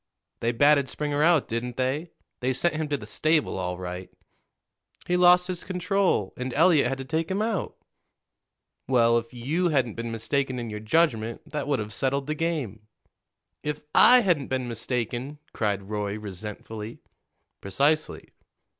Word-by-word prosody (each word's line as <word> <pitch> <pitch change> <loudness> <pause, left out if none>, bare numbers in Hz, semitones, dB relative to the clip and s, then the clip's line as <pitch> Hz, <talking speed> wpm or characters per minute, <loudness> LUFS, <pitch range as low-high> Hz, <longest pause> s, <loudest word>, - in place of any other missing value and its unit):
"They 115 - +1
batted 140 +2 +4
Springer 145 0 -2
out, 165 -2 +4
didn't 120 +1 -4
they? 135 +6 -1 0.3
They 130 +1 0
sent 170 +6 +1
him 155 0 -2
to 145 -1 -1
the 105 - -9
stable, 155 +1 0
all 90 -1 -3
right." 90 0 -6 1.0
"He 180 - +1
lost 180 0 +6
his 180 -2 -4
control, 185 - 0
and 125 -1 -4
Eliot 160 -4 +5
had 135 +2 -2
to 135 - -6
take 160 +3 -1
him 190 +1 -1
out." 215 -4 -2 1.1
"Well, 115 -2 +4
if 115 0 -11
you 150 +9 -1
hadn't 130 -7 +1
been 115 0 -5
mistaken 130 +4 -1
in 120 -2 -5
your 105 - -5
judgment, 115 -2 0
that 150 -1 -3
would 145 -2 +1
have 105 -2 -5
settled 135 +3 -1
the 150 - -2
game." 145 - -3 0.7
"If 150 0 -4
I 250 0 +8
hadn't 175 - +1
been 130 -1 -2
mistaken!" 120 +4 -3 0.2
cried 105 -3 -1
Roy 105 0 -3
resentfully. 105 +2 -7 0.6
"Precisely." 145 +11 0
130 Hz, 155 wpm, -26 LUFS, 115-155 Hz, 1.1 s, I